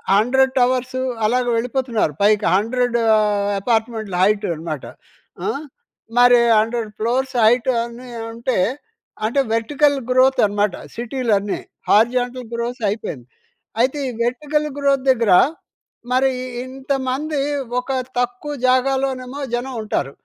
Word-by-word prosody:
100 260 +5 +3
towers 255 +1 +1 0.2
అలాగా 245 +2 +1
వెళ్ళిపోతున్నారు 235 - -1
పైకి 210 0 +3
100 240 +3 +1 0.2
ఆహ్, 205 -1 +1
అపార్ట్మెంట్ల 220 -3 -1
హైట్ 210 +1 +2
అనమాట. 155 -3 -5 0.6
ఆహ్, 310 -8 -2 0.6
మరి 245 0 +7 0.2
100 225 0 -1
ఫ్లోర్స్ 255 +4 0
హైట్ 240 +3 +4
అని 240 +1 -9 0.2
అంటే, 235 +1 -2 0.7
అంటే 245 +5 0
వర్టికల్ 285 +5 +2
గ్రోత్ 260 +1 +4
అనమాట 205 -2 0 0.2
సిటీలు 240 -1 -1
అన్ని. 200 0 -4 0.3
హారిజాంటల్ 245 +2 +2
గ్రోత్ 235 +1 -4
అయిపోయింది. 150 - -5 0.5
అయితే 265 +4 +1
ఈ - - -4
వెర్టికల్ 295 +5 -1
గ్రోత్ 275 -2 +2
దగ్గర 230 -6 +1 0.8
మరి 260 +1 +3 0.3
ఇంతమంది 270 +2 -2 0.4
ఒక 250 +2 -5 0.3
తక్కువ 245 +4 -2
జాగాలోనేమో 260 0 0
జనం 250 +2 -2
ఉంటారు. 140 -10 -2
245 Hz, 115 wpm, -20 LUFS, 220-260 Hz, 0.8 s, మరి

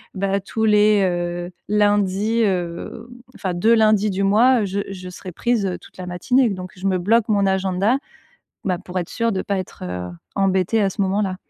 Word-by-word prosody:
bah, 195 +1 0
tous 220 +3 -4
les, 210 -1 +4
heu, 175 0 -2 0.2
lundis, 205 +1 +2
heu, 180 +4 -3 0.3
enfin 185 -2 -3
2 220 +7 +3
lundis 215 -1 +3
du 195 +1 -1
mois, 225 +4 +4
je 195 +1 -2
je 185 -2 -7
serai 185 0 -9
prise 205 -6 0
toute - - -17
la 185 - -6
matinée 240 +8 +2
donc 185 -2 -6
je 195 +2 -2
me 185 -1 +2
bloque 225 +5 +2
mon 200 -2 +2
agenda, 190 +5 +1 0.7
bah, 180 -3 0
pour 185 -1 -5
être 175 - -4
sûre 230 -1 0
de 190 - -1
pas 200 -1 -1
être 185 - -7 0.5
embêtée 195 +2 +1
à 195 - +3
ce 195 - -2
moment-là. 190 0 0
195 Hz, 185 wpm, -21 LUFS, 185-215 Hz, 0.7 s, les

